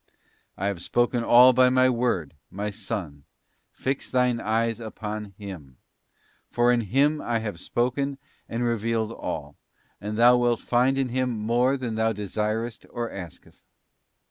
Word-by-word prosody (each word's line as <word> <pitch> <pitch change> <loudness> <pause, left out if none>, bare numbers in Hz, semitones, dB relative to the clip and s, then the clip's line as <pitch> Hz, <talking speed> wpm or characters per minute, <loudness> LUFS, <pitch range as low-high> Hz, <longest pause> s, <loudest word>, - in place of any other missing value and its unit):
't - - -37 0.4
I 95 - -3
have 100 -4 -2
spoken 120 +3 +1
all 125 +2 +7
by 130 +1 +5
My 130 0 +4
Word, 115 - 0 0.2
my 105 +2 -4
Son; 75 -7 -5 0.5
fix 135 +1 -3
thine 125 -2 +2
eyes 115 +1 0
upon 105 -2 -6
Him, 85 - -9 0.7
for 120 0 +3
in 120 -1 +2
Him 140 +8 +2
I 120 -1 -1
have 105 -6 -5
spoken 130 +7 -1 0.3
and 115 +2 -2
revealed 115 -1 0
all, - - -6 0.4
and 105 +1 -4
thou 120 +1 +6
wilt 120 -1 +2
find 125 +2 +2
in 135 -2 0
Him 130 +1 0
more 120 +4 +1
than 125 -4 -4
thou 110 0 +1
desirest 110 +3 -3
or 120 -1 -4
askest. 90 -4 -10
115 Hz, 150 wpm, -25 LUFS, 105-125 Hz, 0.7 s, all